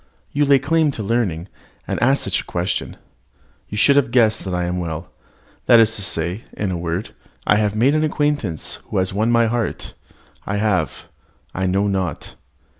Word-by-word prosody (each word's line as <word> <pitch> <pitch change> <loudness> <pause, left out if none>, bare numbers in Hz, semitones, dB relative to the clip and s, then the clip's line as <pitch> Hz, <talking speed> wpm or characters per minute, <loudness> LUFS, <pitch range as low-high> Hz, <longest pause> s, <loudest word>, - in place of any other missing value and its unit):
You 145 +1 +2
lay 140 -1 +6
claim 155 +3 +2
to 110 - -5
learning, 100 -6 -1 0.4
and - - -2
ask 135 +3 +3
such 95 - 0
a - - -16
question. 90 +1 -3 0.7
You 105 - -5
should 140 +6 +5
have 135 -3 +3
guessed 115 -3 +3
that 95 - -3
I 90 0 -1
am 90 +1 -2
well 80 -2 -5 0.6
that 115 - +8
is 115 0 +4
to 105 - -5
say 90 +3 -2
in 100 -3 -2
a - - -2
word, 85 +3 -3 0.3
I 105 - +4
have 105 -1 0
made 125 +6 +3
an 155 0 +2
acquaintance 145 - -1
who - - -3
has 95 0 0
won 110 +4 +1
my 115 -1 +4
heart: 115 0 -2 0.5
I 100 - -2
have 105 -3 -1 0.5
I 95 +1 -1
know 95 +2 +1
not. 95 -6 -2
105 Hz, 190 wpm, -20 LUFS, 90-120 Hz, 0.7 s, that